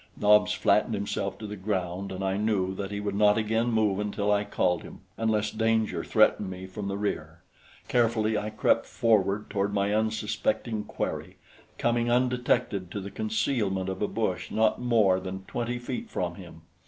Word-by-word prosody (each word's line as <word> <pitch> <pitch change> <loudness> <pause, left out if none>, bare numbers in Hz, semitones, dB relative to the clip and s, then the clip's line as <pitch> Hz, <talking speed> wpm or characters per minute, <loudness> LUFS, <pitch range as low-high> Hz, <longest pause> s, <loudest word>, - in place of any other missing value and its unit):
Nobs 105 0 +5
flattened 105 +2 +2
himself 100 -1 -3
to 110 - -8
the 105 0 -5
ground, 95 -1 -3
and 95 +1 -4
I 95 0 0
knew 100 -3 0
that 95 0 -4
he 100 0 -4
would 105 -1 -2
not 105 +1 +4
again 110 +2 +1
move 105 -3 +2
until 105 0 -1
I 105 0 +3
called 90 -3 0
him, - - -11
unless 110 -2 0
danger 110 -5 +1
threatened 100 - +3
me 95 0 -7
from 100 +2 -6
the 100 0 -2
rear. 105 0 -4 0.4
Carefully 110 -2 +2
I 105 0 -1
crept 110 - +2
forward 105 -2 +1
toward 100 +1 0
my 100 +1 +1
unsuspecting 110 - -1
quarry, - - -4 0.4
coming 120 0 +1
undetected 125 -6 +1
to 100 - -4
the 100 0 -7
concealment 105 -3 -1
of 95 - -5
a 105 - +2
bush 95 -4 -2
not 110 +1 +2
more 110 -6 +3
than 95 0 -6
twenty 120 +4 -3
feet 225 - -5
from 90 - -2
him. 85 -3 -12
105 Hz, 175 wpm, -27 LUFS, 95-110 Hz, 0.4 s, Nobs